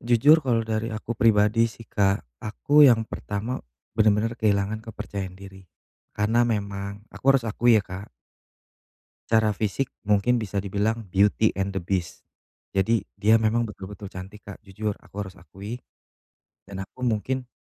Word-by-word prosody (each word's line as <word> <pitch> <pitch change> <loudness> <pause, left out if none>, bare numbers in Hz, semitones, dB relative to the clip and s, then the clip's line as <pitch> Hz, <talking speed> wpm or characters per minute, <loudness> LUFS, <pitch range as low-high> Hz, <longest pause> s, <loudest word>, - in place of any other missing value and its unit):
Jujur 120 +7 +5
kalau 120 -3 +2
dari 110 0 -2
aku 110 +2 -4
pribadi 110 0 +4
sih 115 +1 -13
Kak 100 0 +2 0.2
aku 145 +7 +4
yang 115 -2 +4
pertama 105 +5 -4 0.4
benar-benar 110 +1 +3
kehilangan 105 0 +1
kepercayaan 100 -3 -5
diri 95 -1 -11 0.5
karena 110 +3 +2
memang 100 -1 -3 0.2
aku - - -12
harus 135 -3 +1
akui 115 +2 +4
ya 105 - +2
Kak 95 +2 -8 1.2
secara 110 -1 +3
fisik 105 +5 -2 0.2
mungkin 105 +4 +3
bisa 100 -3 -2
dibilang 105 +3 -1
beauty 105 +3 +3
and 95 0 -1
the 95 - -2
beast, 90 -1 -3 0.5
jadi 105 +2 +1 0.2
dia 110 +2 +4
memang 115 +2 +2
betul-betul 100 -1 -9
cantik 95 +2 -10
Kak 100 +2 -10
jujur 105 +1 -4
aku - - -22
harus 95 - -11
akui, 100 +7 -9 0.9
dan 95 -1 -5
aku 125 - -19
mungkin 125 +2 -1
105 Hz, 145 wpm, -25 LUFS, 100-115 Hz, 1.2 s, Jujur